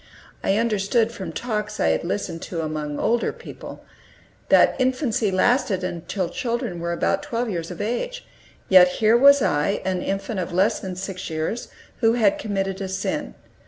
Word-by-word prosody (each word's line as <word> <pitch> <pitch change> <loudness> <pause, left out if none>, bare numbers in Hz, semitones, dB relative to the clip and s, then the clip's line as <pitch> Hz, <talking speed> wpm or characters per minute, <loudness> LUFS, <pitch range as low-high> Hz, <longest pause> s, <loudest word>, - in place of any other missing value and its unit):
I 195 - +2
understood, 225 0 +1
from 190 -7 -6
talks 210 +1 -3
I 80 - +3
had 80 - +1
listened 165 +11 -3
to 165 -2 -3
among 155 -2 -3
older 235 +1 +1
people, - - -11 0.6
that - - +5
infancy 255 -4 +1
lasted 195 0 +2
until 180 +1 -3
children 230 -4 -3
were 170 0 -2
about 170 - 0
twelve 245 -5 -2
years 170 -3 -4
of 180 - -8
age. - - -3 0.4
Yet 185 -1 +8
here 220 +1 +4
was 280 +1 +7
I, 175 +2 +1
an 185 -1 -1
infant 195 +1 -3
of 180 0 -3
less 185 +4 +2
than 185 -2 -6
six 185 0 -5
years, 160 +9 -3 0.3
who 225 -2 +4
had 220 -5 +2
committed 195 -2 -2
a 195 - -2
sin. 245 +11 -3
195 Hz, 165 wpm, -23 LUFS, 180-235 Hz, 0.6 s, Yet